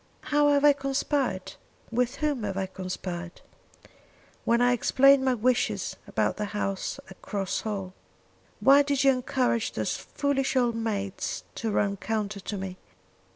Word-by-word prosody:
"How 295 Hz, 0 st, +5 dB
have 285 Hz, 0 st, +4 dB
I 290 Hz, -, +8 dB
conspired? 275 Hz, -6 st, -1 dB, 0.4 s
with 250 Hz, +2 st, 0 dB
whom 295 Hz, -5 st, -1 dB
have 200 Hz, -2 st, -3 dB
I 195 Hz, -, 0 dB
conspired?" 185 Hz, -2 st, -6 dB, 1.0 s
"When 235 Hz, 0 st, +3 dB
I 245 Hz, 0 st, +4 dB
explained 275 Hz, +2 st, +5 dB
my 260 Hz, -1 st, +2 dB
wishes 245 Hz, +2 st, 0 dB
about -, -, 0 dB
the 210 Hz, -, -1 dB
house 195 Hz, -2 st, -2 dB
at 190 Hz, -, -14 dB
Cross 195 Hz, -2 st, -2 dB
Hall, 195 Hz, -4 st, -4 dB, 0.7 s
why 275 Hz, +6 st, +7 dB
did 280 Hz, -1 st, +1 dB
you 275 Hz, -, +6 dB
encourage 250 Hz, -2 st, 0 dB
those -, -, -1 dB
foolish 275 Hz, -2 st, -1 dB
old 245 Hz, -2 st, +3 dB
maids 205 Hz, -4 st, -3 dB
to 225 Hz, -, -3 dB
run 200 Hz, -1 st, +1 dB
counter 210 Hz, -1 st, -2 dB
to 205 Hz, +1 st, -5 dB
me. 190 Hz, -1 st, -5 dB
235 Hz, 150 wpm, -27 LUFS, 200-270 Hz, 1.0 s, I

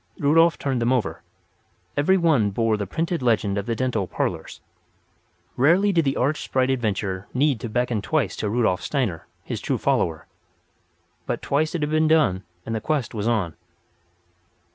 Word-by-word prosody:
Rudolf 165 Hz, +3 st, +4 dB
turned 130 Hz, -4 st, -1 dB
them 120 Hz, +2 st, +2 dB
over. 125 Hz, -4 st, -1 dB, 0.7 s
Every 190 Hz, +7 st, +3 dB
one 155 Hz, -, +3 dB
bore 110 Hz, +2 st, +1 dB
the 105 Hz, -2 st, -4 dB
printed 165 Hz, -, -2 dB
legend 110 Hz, -5 st, +1 dB
of 100 Hz, +1 st, -3 dB
the 115 Hz, -, 0 dB
dental 115 Hz, -6 st, -1 dB
"parlours." -, -, -3 dB, 1.0 s
Rarely 175 Hz, +10 st, +4 dB
did 165 Hz, -3 st, +2 dB
the 135 Hz, -, 0 dB
arch 140 Hz, +4 st, 0 dB
sprite 130 Hz, 0 st, 0 dB
Adventure 100 Hz, -6 st, -2 dB
need 135 Hz, -2 st, +2 dB
to 115 Hz, -, -5 dB
beckon 120 Hz, -1 st, 0 dB
twice 125 Hz, -4 st, 0 dB
to 105 Hz, -, -2 dB
Rudolf 110 Hz, -4 st, +1 dB
Steiner, 120 Hz, -, -2 dB, 0.2 s
his -, -, -5 dB
true -, -, -1 dB
follower. 80 Hz, -2 st, 0 dB, 1.0 s
But -, -, -3 dB
twice 155 Hz, +4 st, 0 dB
it 160 Hz, -, -1 dB
had 150 Hz, -, -1 dB
been 155 Hz, 0 st, +3 dB
done, 135 Hz, -, +3 dB, 0.2 s
and 115 Hz, -, -4 dB
the 110 Hz, -, -2 dB
quest 140 Hz, -4 st, -1 dB
was 110 Hz, -1 st, -2 dB
on. 105 Hz, -9 st, 0 dB
125 Hz, 165 wpm, -23 LUFS, 105-150 Hz, 1.0 s, Rudolf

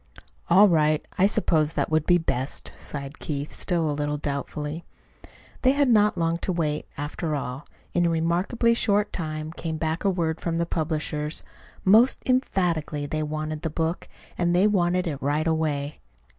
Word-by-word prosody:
"All 195 Hz, +5 st, +7 dB
right. 155 Hz, -3 st, +2 dB
I 190 Hz, -, +6 dB
suppose 160 Hz, -7 st, +2 dB
that -, -, -1 dB
would 155 Hz, -1 st, +1 dB
be 175 Hz, -, +6 dB
best," 135 Hz, -5 st, -2 dB
sighed 140 Hz, 0 st, -6 dB
Keith, 145 Hz, -1 st, -4 dB
still 170 Hz, -4 st, 0 dB
a 150 Hz, -, 0 dB
little 145 Hz, 0 st, -1 dB
doubtfully. 150 Hz, +2 st, -4 dB, 0.8 s
They 260 Hz, 0 st, +4 dB
had 285 Hz, -2 st, +2 dB
not 210 Hz, -4 st, +4 dB
long 165 Hz, 0 st, 0 dB
to 185 Hz, -, -2 dB
wait, 155 Hz, -4 st, -1 dB
after 150 Hz, +2 st, -3 dB
all. 135 Hz, 0 st, -5 dB, 0.3 s
In 175 Hz, -1 st, +3 dB
a -, -, +2 dB
remarkably 175 Hz, +9 st, +1 dB
short 210 Hz, -2 st, +1 dB
time 155 Hz, -2 st, -4 dB
came 165 Hz, -1 st, -4 dB
back 160 Hz, +1 st, -2 dB
word 170 Hz, -4 st, 0 dB
from 165 Hz, -1 st, -1 dB
the 170 Hz, -, +1 dB
publishers. 155 Hz, -2 st, -2 dB, 0.4 s
Most 220 Hz, +7 st, +5 dB
emphatically 175 Hz, -, 0 dB
they 155 Hz, +2 st, -2 dB
wanted 155 Hz, 0 st, -3 dB
the 160 Hz, -, -2 dB
book, 160 Hz, +2 st, -2 dB, 0.3 s
and 175 Hz, 0 st, +2 dB
they 185 Hz, +3 st, +5 dB
wanted 180 Hz, -3 st, +2 dB
it 145 Hz, -5 st, -4 dB
right 145 Hz, +3 st, 0 dB
away. 155 Hz, -3 st, -1 dB
160 Hz, 165 wpm, -25 LUFS, 150-180 Hz, 0.8 s, All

